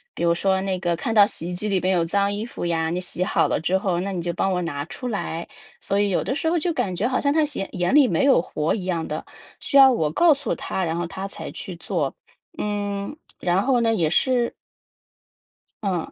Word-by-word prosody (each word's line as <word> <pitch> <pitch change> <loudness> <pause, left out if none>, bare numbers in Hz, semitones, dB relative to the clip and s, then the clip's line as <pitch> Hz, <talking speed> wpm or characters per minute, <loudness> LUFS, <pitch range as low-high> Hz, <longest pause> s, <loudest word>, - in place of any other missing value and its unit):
比 - - -3
如 170 - +4
说 190 +2 +1
那 190 -1 -1
个 175 -2 0
看 225 +7 -2
到 205 -2 +7
洗 170 -3 -5
衣 - - -4
机 210 +4 -3
里 195 -3 +1
边 185 +1 +2
有 170 -2 +2
脏 200 +3 +1
衣 210 +2 -3
服 240 - -6
呀， 165 -1 0
你 180 +2 -2
洗 180 0 -5
好 - - +2
了 - - +1
之 180 +4 +1
后， 185 -3 -1
那 195 +1 -3
你 175 - -2
就 175 0 -2
帮 195 +3 0
我 180 - 0
拿 145 -4 -3
出 250 +8 -6
来。 170 -5 -3 0.4
所 200 +1 0
以 205 - +2
有 185 - +1
的 - - -1
时 320 +3 0
候 345 - +2
就 340 +2 0
感 190 - -1
觉 200 - -1
好 255 +1 +1
像 285 0 +1
她 315 - +3
眼 285 -10 -3
眼 180 +4 0
里 290 -2 +7
没 - - +1
有 275 -10 +5
活 155 -2 -1
一 190 -4 -3
样 170 -3 -1
的， 155 - -5 0.3
需 - - -5
要 270 -1 +9
我 160 -11 +1
告 325 - +5
诉 280 - -3
她， 190 -2 -3
然 165 0 -1
后 175 - -2
她 190 +3 -5
才 - - -7
去 185 - -7
做， 165 -4 -2 0.4
嗯。 205 +4 -3 0.2
然 180 +2 +1
后 260 -2 +3
呢， 230 -1 +2
也 170 -8 +1
是 245 - +2 1.3
嗯。 180 -5 -2
190 Hz, 265 characters per minute, -23 LUFS, 175-225 Hz, 1.3 s, 要